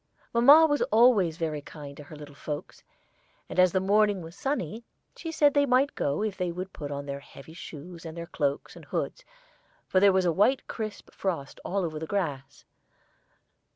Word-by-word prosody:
Mamma 280 +7 +8
was 290 -2 +1
always 215 -8 +5
very 155 -3 -2
kind 145 -1 -10
to 150 - -10
her 155 - -11
little 145 -1 -11
folks, 145 +1 -6 0.7
and - - -3
as 185 -1 +6
the 190 - +2
morning 205 0 +2
was 165 +2 -10
sunny, 230 - -3 0.3
she 330 - -6
said 295 -3 +4
they 285 -1 +3
might 260 +2 +3
go 145 +8 -1
if 215 -3 -2
they 180 -2 -1
would 185 +2 -6
put 145 -2 -6
on 140 0 -5
their 140 0 -5
heavy 140 +2 -13
shoes 165 +1 -10
and 165 0 -8
their 170 - -5
cloaks 145 -4 -2
and - - -12
hoods, - - -3 0.6
for 185 - +3
there 200 +1 +6
was 190 -1 +2
a 175 - +3
white 230 +9 +2
crisp 215 -2 -6
frost 165 -8 -3
all 195 -1 -1
over 155 -2 -4
the 160 - -5
grass. 150 -9 -3
180 Hz, 190 wpm, -28 LUFS, 150-215 Hz, 0.7 s, Mamma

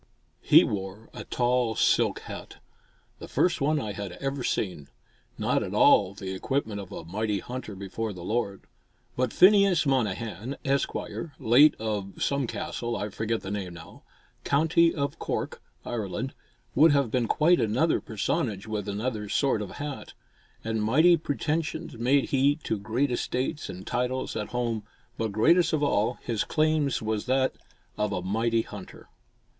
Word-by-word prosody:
He - - +7
wore 100 +2 -5
a - - -8
tall 120 -2 +1
silk - - +2
hat, - - -9 0.6
the - - -8
first 175 -3 +1
one 150 +2 +2
I 110 -6 -3
had 100 -3 -6
ever 135 +5 -3
seen, 90 -12 -2 0.5
not - - +1
at - - -4
all 95 - +5
the 95 -1 -5
equipment 105 +1 -2
of 95 - -11
"a 80 - -7
mighty 105 +4 -1
hunter 120 -1 -6
before 100 +3 -4
the 90 -3 -9
Lord;" 100 -1 -2 0.5
but 125 -2 0
Phineas 195 -3 +5
Monnehan, 115 -1 -1
Esq., 135 0 0 0.4
late 130 +7 +6
of 105 -3 -3
some 140 -2 0
castle 120 +1 -3
(I 105 - -3
forget 110 +2 -2
the 95 - -6
name 95 -4 -4
now), 85 - -12 0.4
County 160 +3 +3
of 140 -3 -3
Cork, - - -3 0.2
Ireland, 115 +3 -3 0.4
would 150 +3 +6
have 140 -5 +2
been 120 -1 +1
quite 165 +7 +4
another 125 +10 +2
personage 110 - -2
with 105 -2 -3
another 105 0 -3
sort 135 -2 +1
of 100 - -6
hat. 145 -1 -6 0.5
And 110 -1 -1
mighty 155 +11 +5
pretension 160 +1 -2
made 135 +3 +2
he 140 +1 +3
to 110 - -2
great 120 +7 0
estates 130 +5 -2
and 95 0 -8
titles 125 +1 -2
at 105 - -3
home, 120 -3 -2 0.4
but 110 -2 -1
greatest 165 - +4
of 150 -2 +1
all 120 -3 +1
his 115 -4 -1
claims 155 -5 +1
was 110 +1 -2
that 130 +1 +2 0.5
of 105 -1 0
"a 90 -2 -2
mighty 115 +4 +1
hunter." 100 -3 -11
115 Hz, 155 wpm, -27 LUFS, 105-140 Hz, 0.6 s, He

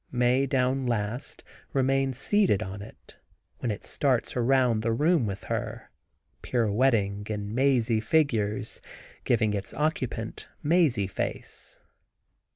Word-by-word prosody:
Mae 125 +2 +2
down 130 0 +1
last, 115 +2 -3 0.3
remains 135 -1 +1
seated 185 - +2
on 95 +1 -7
it, 105 - -14 0.4
when 120 - -2
it 105 - -4
starts 130 -5 0
around 125 -2 +3
the 115 +1 0
room 150 +1 +2
with 100 0 -5
her, - - -4 0.5
pirouetting 105 -3 +1
in 105 -1 -4
mazy 125 -3 +2
figures, 115 -5 0 0.4
giving 110 -3 +2
its 100 -1 -4
occupant 130 -7 -2 0.2
mazy 150 - +3
face. 95 - -6
120 Hz, 115 wpm, -27 LUFS, 105-135 Hz, 0.5 s, around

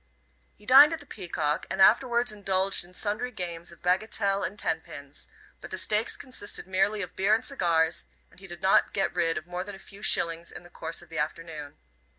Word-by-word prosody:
He 210 - -20
dined 275 +6 +8
at 325 - -4
the 290 - -13
Peacock 170 - -2
and 190 - -3
afterwards 235 +3 +4
indulged 195 -2 +1
in 180 +1 -14
sundry 215 +5 -2
games 175 -6 -5
of 170 - -17
bagatelle 195 +2 +1
and 205 - -4
ten 160 - -1
pins; 145 0 -10 0.3
but - - -9
the - - -5
stakes 215 +2 0
consisted 255 -6 -4
merely 195 +3 +1
of 180 - -9
beer 200 +3 +3
and 225 - -3
cigars, 170 -10 +1 0.2
and - - -16
he 195 - -12
did 175 0 -10
not 190 - +4
get 195 -3 0
rid 165 -1 +1
of 155 - -5
more 180 +1 -4
than 205 0 -8
a - - -11
few 200 +1 -13
shillings 170 -3 +3
in - - -10
the 175 - -16
course 165 +1 -5
of 175 - -19
the 165 -2 -5
afternoon. 150 -1 -5
190 Hz, 210 wpm, -27 LUFS, 170-210 Hz, 0.3 s, dined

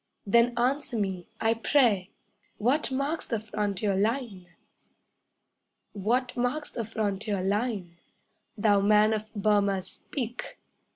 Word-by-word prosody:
Then 235 +3 +3
answer 250 0 0
me, 190 -4 -2
I 225 0 +3
pray! 225 -5 +2 0.5
What 255 +8 +1
marks 280 +5 -1
the 230 - -1
frontier 210 -2 -1
line? 210 -3 -1 1.5
What 245 +6 0
marks 250 +5 -1
the 230 - -3
frontier 205 -2 -2
line? 200 -4 -1 0.6
Thou 205 -1 +4
man 210 +2 +5
of 215 0 -4
Burmah, 200 -2 +2
speak! 245 +2 -6
215 Hz, 110 wpm, -28 LUFS, 200-245 Hz, 1.5 s, man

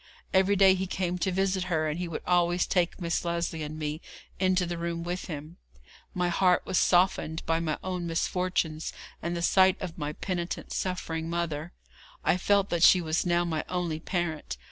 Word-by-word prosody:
Every 190 +1 +4
day 195 -1 +6
he 190 0 -2
came 180 -1 -2
to 190 - 0
visit 190 0 0
her, 160 -3 0
and 155 +2 -2
he 180 - -2
would 165 - -5
always 175 0 +2
take 180 0 0
Miss 170 -2 -1
Lesley 170 -2 -2
and 155 +1 -5
me 155 +1 -3 0.4
into 185 -1 +2
the 170 -1 -4
room 170 0 -3
with 175 +2 -3
him. 155 +1 -7 0.6
My 180 -1 +1
heart 180 +1 +3
was 185 - +1
softened 175 -3 +2
by 165 0 +1
my 160 -2 -1
own 180 -2 -3
misfortunes, 165 -1 -1 0.3
and 170 0 -2
the 170 - -3
sight 190 +1 +4
of 180 -3 -6
my 150 0 -3
penitent, 175 0 -4
suffering 165 -3 -3
mother. 170 -1 -3 0.5
I - - +3
felt 200 +1 +2
that 170 -1 0
she 185 - +8
was 165 +1 -1
now 175 0 +2
my 160 -3 -1
only 175 -3 -2
parent. 160 - -3
175 Hz, 190 wpm, -28 LUFS, 165-185 Hz, 0.6 s, she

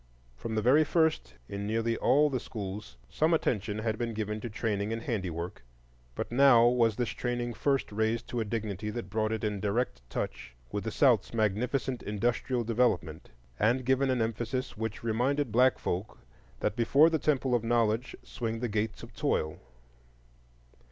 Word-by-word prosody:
From 110 - -5
the 110 - 0
very 140 +7 +6
first 155 - +1
in 100 0 -4
nearly 115 +1 0
all 145 +6 +4
the 130 - 0
schools 100 - -7
some 160 - +2
attention 105 -8 -1
had 110 0 -2
been 115 -2 -2
given 105 0 -3
to 120 - -4
training 105 -1 -2
in 115 0 -3
handiwork, 90 - -4 0.5
but - - -4
now 120 -2 +6
was 120 -3 +3
this 120 0 -1
training 120 -1 -2
first 135 +2 0
raised 110 +2 0
to 120 - -2
a - - +1
dignity 105 -2 -3
that 105 -3 -5
brought 110 0 0
it 110 0 -2
in 105 -2 -1
direct 105 - -1
touch 60 -1 -5 0.2
with 105 - -3
the - - 0
South's 120 -3 +3
magnificent 120 +5 0
industrial 120 +4 -1
development, 115 -9 0 0.3
and 120 +4 +2
given 130 +1 +2
an 125 -3 +2
emphasis 120 +4 -3
which 110 +1 -4
reminded 125 +4 0
black 125 +3 +4
folk 95 +5 -3 0.4
that - - 0
before 140 +7 +5
the 160 - +1
Temple 135 -3 +1
of 120 -2 +2
Knowledge 115 0 +1
swing 115 -2 -4
the 120 - -1
Gates 105 0 -2
of - - -11
Toil. 75 0 -1
115 Hz, 170 wpm, -30 LUFS, 105-125 Hz, 0.5 s, very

